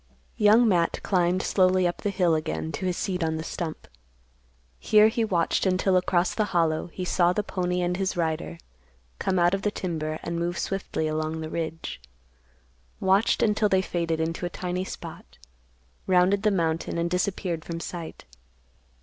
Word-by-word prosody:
Young 220 +3 +5
Matt 175 -5 +2
climbed 180 0 +1
slowly 185 -1 +3
up 175 - -2
the 205 - -2
hill 180 -4 +2
again 155 0 -2
to 185 +5 -3
his 180 - -1
seat 180 -2 -2
on 160 0 -1
the 160 - -4
stump. 165 - -5 0.9
Here 215 0 +5
he 230 +1 0
watched 185 -2 +1
until 185 +1 +2
across 180 0 +2
the 215 - +1
Hollow 160 -1 +1
he 180 +2 -6
saw 175 0 +3
the 210 - -1
pony 180 -2 -1
and 175 0 0
his 190 -2 -1
rider 155 - -2 0.6
come 185 - 0
out 175 +1 +3
of 195 - 0
the 210 - +1
timber 155 -6 -3
and 170 0 -3
move 175 +1 -2
swiftly 195 -5 -2
along 155 +1 -2
the 155 0 -6
ridge; 165 - -4 1.0
watched 195 +3 +3
until 210 -1 +2
they 190 -1 +3
faded 170 -3 -2
into 165 +2 -2
a 175 - -1
tiny 180 +1 -3
spot, - - -9 0.7
rounded 185 +2 +3
the 215 - +3
mountain 165 -4 -1
and 170 0 -1
disappeared 180 -3 -1
from 165 +1 -5
sight. 170 -1 -7
180 Hz, 170 wpm, -26 LUFS, 165-190 Hz, 1.0 s, Young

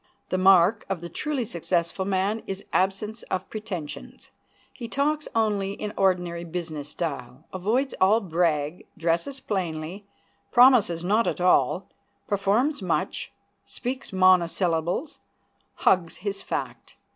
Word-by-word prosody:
The 185 - 0
mark 190 +2 +5
of 195 -3 -1
the 170 +1 -7
truly 275 - -2
successful 170 -2 -1
man 200 +3 0
is 195 +1 -5
absence 200 +4 0
of 185 0 -2
pretensions. 195 -9 -7 0.4
He 235 - -7
talks 295 +5 0
in - - -13
only 205 -2 0
ordinary 180 -3 +1
business 160 -4 -5
style, 140 -4 -5
avoids 225 +9 0
all 200 +4 +5
brag, 165 -4 -1
dresses 170 +12 -1
plainly, 185 -2 -4 0.4
promises 235 -9 +5
not 215 +5 +2
at - - -1
all, 180 0 +3 0.4
performs 210 +8 +1
much, 185 - -2 0.3
speaks 255 0 -5
monosyllables, 180 - +2 0.6
hugs 175 -3 +2
his 200 +1 -4
fact. - - -5
190 Hz, 120 wpm, -25 LUFS, 170-215 Hz, 0.6 s, mark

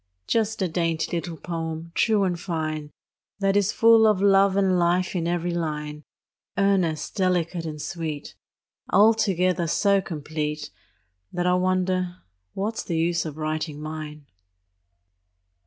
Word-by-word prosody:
Just 220 - 0
a - - +1
dainty 165 -1 -1
little 170 -1 -4
poem, 165 -1 -5
true 215 0 +2
and 180 -3 -1
fine, 155 -4 -3 0.5
That 195 -1 +1
is 205 0 +3
full 225 -1 +6
of 210 -3 +3
love 195 0 +4
and 190 -2 +3
life 175 +2 +1
in 170 -2 -1
every 175 0 -1
line, 150 -3 -4 0.5
Earnest, 190 -6 +1
delicate, 180 -2 0
and 150 -1 -6
sweet, 155 -2 -5 0.6
Altogether 190 -4 +3
so 200 +4 +3
complete 150 - -4 0.6
That 175 0 -2
I 180 - +3
wonder 185 0 0 0.4
what's 215 +3 -2
the 170 - -3
use 170 +1 +1
of 150 -1 -7
writing 155 -1 -3
mine. 155 -1 -7
175 Hz, 130 wpm, -25 LUFS, 160-195 Hz, 0.6 s, full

